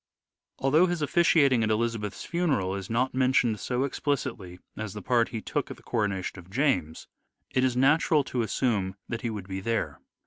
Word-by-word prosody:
Although 150 +7 +4
his 175 -3 -1
officiating 145 -6 +4
at 110 - +1
Elizabeth's 110 -2 -1
funeral 150 - 0
is 95 -1 -5
not 125 +3 0
mentioned 125 -4 +2
so 125 +1 -1
explicitly 130 -10 -3 0.2
as 110 -2 -5
the 105 - -5
part 120 -2 +2
he 115 - -5
took - - -2
at - - -7
the - - -19
coronation 100 -4 -2
of 90 0 -14
James, 95 - 0 0.4
it 130 - +1
is 125 -1 +1
natural 150 +3 +4
to 125 -2 -2
assume 105 -5 0
that 115 -1 -4
he 120 - -2
would 105 -4 -6
be 95 0 -4
there. 115 +3 -2
115 Hz, 180 wpm, -27 LUFS, 105-135 Hz, 0.4 s, Although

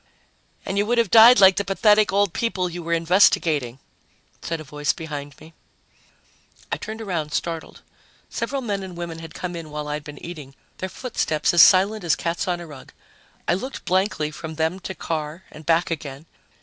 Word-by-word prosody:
"And 195 +1 -1
you 205 - +1
would 240 +1 +1
have 230 -5 +2
died 230 +1 +9
like 190 -1 +7
the 200 - +1
pathetic 210 +2 +3
old 200 -2 +2
people 185 -6 -1
you 175 +1 -6
were 170 0 -2
investigating," 165 -7 +3 0.6
said 165 -1 -4
a - - -7
voice 150 0 -1
behind 145 -3 -7
me. 160 +1 -15 1.2
I - - 0
turned 220 +1 -7
around, 160 -7 -3
startled. 165 -2 -4 0.4
Several 275 -1 -3
men 200 -4 -2
and 185 -2 -8
women 170 -1 -6
had 165 -1 -10
come 180 -1 -5
in 165 -2 -7
while 150 0 -5
I'd 150 0 -4
been 150 -1 -10
eating, 150 -6 -9 0.2
their 185 - -4
footsteps 180 - -1
as 175 - +7
silent 195 +5 +5
as 165 -3 +2
cats 170 +3 -3
on 175 -1 -1
a 175 - -8
rug. 145 -5 -13 0.5
I - - +3
looked 255 +9 -5
blankly 185 -5 0
from 160 +1 -8
them 160 +4 -1
to 190 +1 -7
Carr 160 +2 -4
and 155 0 -13
back 170 +1 +2
again. 145 -2 -6
170 Hz, 190 wpm, -23 LUFS, 155-195 Hz, 1.2 s, died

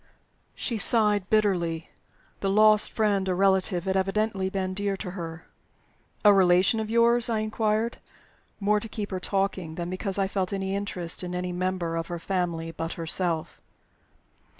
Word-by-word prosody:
She 230 -4 -3
sighed 210 -3 +3
bitterly. 175 -7 0 0.5
The 195 - -1
lost 215 +1 +5
friend 200 -3 +1
or 180 - +1
relative 190 -1 +2
had 190 0 -1
evidently 195 0 0
been 190 -1 -2
dear 200 0 -1
to 185 -2 -5
her. 165 -3 -7 0.8
"A 205 - +8
relation 185 +3 +4
of 220 -1 -3
yours?" 235 +1 +3
I 225 - +1
inquired 215 +1 -1 0.6
more 210 +1 +2
to 225 - -9
keep 205 -1 -5
her 185 - -2
talking 190 -4 -2
than 175 +1 -4
because 190 +1 -1
I 195 -1 +1
felt 190 -1 -2
any 195 0 -2
interest 185 -4 -2
in 180 0 -4
any 180 0 -3
member 180 -2 -2
of 165 0 -3
her 175 - -4
family 170 -2 -2
but 165 0 -4
herself. 165 0 -2
190 Hz, 160 wpm, -26 LUFS, 180-210 Hz, 0.8 s, A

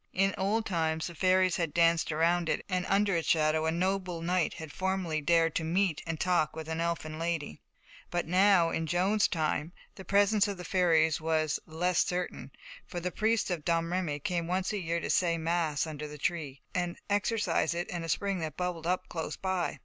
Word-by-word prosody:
In 195 +1 +2
old 215 +4 0
times 160 -3 -1
the 175 - -6
fairies 185 0 +3
had 165 -4 -2
danced 170 -1 +3
round 165 +2 +2
it, - - -1
and 185 -1 -1
under 200 -1 +2
its 165 - -1
shadow 155 0 +2
a - - +2
noble 185 0 -1
knight 180 0 0
had 160 -2 -8
formerly 185 -4 -1
dared 165 +1 +3
to 165 - -2
meet 175 0 +1
and 165 -2 -3
talk 175 -5 +1
with 160 -1 -6
an 160 0 -2
elfin 165 -2 -3
lady. 165 -3 -3 0.5
But 175 0 -1
now, 180 -1 +4
in 160 0 -2
Joan's 190 +6 +2
time, 155 0 -1 0.2
the 190 - -10
presence 205 +2 +3
of 200 -2 -4
the 180 - -7
fairies 165 -4 +2
was 155 -1 0
less 175 +3 +1
certain, 175 -7 -4 0.4
for 175 - -5
the 180 +1 -3
priest 220 -1 +1
of 170 -4 -2
Domremy 165 -1 0
came 170 +1 -2
once 185 +3 -1
a 210 - -1
year 170 0 -1
to - - -5
say 170 -2 +2
mass 165 -3 0
under 150 -1 -6
the 150 0 -9
tree, 145 -3 -3
and 175 -1 -2
exorcise 205 -5 +1
it 175 +1 -2
and 175 -1 -4
a 165 - -5
spring 195 +3 0
that 155 -3 -5
bubbled 180 -2 -3
up 180 +1 0
close 160 -2 -4
by. 190 -2 -2
170 Hz, 200 wpm, -30 LUFS, 160-185 Hz, 0.5 s, now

